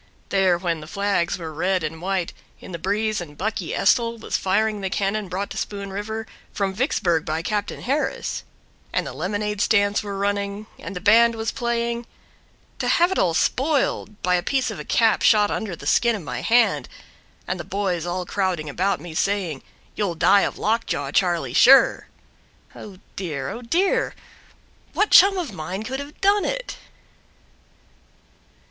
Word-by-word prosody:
There 190 -3 +3
when 170 -2 -2
the 155 - -10
flags 200 -1 0
were 160 -3 -7
red 180 +3 0
and 160 +1 -4
white 185 -2 -2 0.3
In - - -11
the 170 - -5
breeze 210 +3 -1
and 150 -4 -10
"Bucky" 215 +4 -3
Estil 230 -1 +2
Was - - -4
firing 210 +2 +1
the 190 - -2
cannon 200 +1 -1
brought 190 +3 -3
to - - -6
Spoon 200 -1 -4
River 220 +2 -4 0.3
From 195 -2 -1
Vicksburg 185 - +1
by 160 +1 -3
Captain 205 +1 -3
Harris; 280 +4 -2 0.5
And - - 0
the - - -6
lemonade 210 +2 -2
stands 205 -1 +3
were 200 -1 -5
running 200 +1 -2
And - - -7
the 180 - -5
band 230 +3 +5
was 225 0 -2
playing, 235 -1 -2 0.7
To - - -1
have 345 +2 +3
it 380 - 0
all 170 -3 +2
spoiled 265 - 0
By 180 - +2
a 180 - +3
piece 265 +7 0
of - - -7
a - - -5
cap 225 -2 +2
shot 210 -2 +4
under 205 -6 -3
the - - -12
skin 235 -1 +3
of 200 - -6
my - - -5
hand, 235 0 +2 0.6
And - - -2
the - - -4
boys 190 -4 -2
all 175 +1 -3
crowding 180 -6 -1
about 190 +5 0
me 165 +1 -9
saying: 180 -5 -1 0.3
"You'll 200 -5 -1
die 200 +4 +5
of - - -2
lock 225 +2 0
jaw, 140 -1 -2
Charlie, 170 -8 +1
sure." 270 - +6 0.7
Oh, 200 -3 -10 0.2
dear! 145 -8 -4
oh, 240 - -7
dear! 345 +11 +1 0.8
What 420 - +1
chum 390 +1 +7
of 325 - -3
mine 185 +5 -5
could 265 +4 -4
have 285 +2 -9
done 400 +1 +4
it? - - -3
200 Hz, 175 wpm, -23 LUFS, 180-225 Hz, 0.8 s, chum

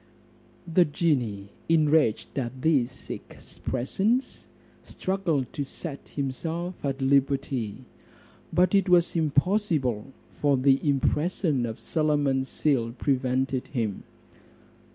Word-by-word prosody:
The 175 +1 +4
genie, 125 - -1 0.2
enraged 155 -7 +3
at 130 +1 -5
these 135 -5 +1
expressions, 195 - -3 0.3
struggled 175 -9 -2
to 145 - -2
set 140 +1 -7
himself 160 +6 -3
at 135 -1 -2
liberty; 135 -4 0 0.7
but 180 +3 +3
it 195 -1 +3
was 175 -1 +4
impossible, 155 - +1 0.3
for 145 -2 +3
the 135 +1 +4
impression 150 -1 +1
of 110 - -6
Solomon's 145 -4 0
seal 120 -6 0
prevented 130 0 0
him. 115 -7 -2
140 Hz, 95 wpm, -26 LUFS, 130-165 Hz, 0.7 s, The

